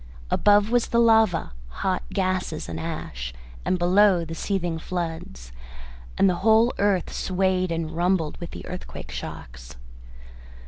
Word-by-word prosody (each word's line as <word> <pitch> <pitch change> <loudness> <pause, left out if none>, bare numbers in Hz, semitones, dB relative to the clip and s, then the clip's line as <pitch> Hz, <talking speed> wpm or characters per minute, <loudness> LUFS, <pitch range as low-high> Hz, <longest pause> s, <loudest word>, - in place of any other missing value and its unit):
Above 205 +1 +4
was 245 -1 +2
the 235 - 0
lava, 220 - +4 0.3
hot 185 -1 +1
gases 185 -4 -1
and - - -5
ash, 65 - -5 0.3
and 185 - +1
below 180 0 +4
the 165 - -6
seething 175 -1 -2
floods, 160 - -5 0.7
and 195 - +5
the 180 -2 +1
whole 225 +3 +4
earth 200 -3 +1
swayed 185 -1 0
and 165 -1 -2
rumbled 170 -1 0
with 170 - -6
the - - -9
earthquake 180 - -8
shocks. - - -8
180 Hz, 135 wpm, -24 LUFS, 160-200 Hz, 0.7 s, and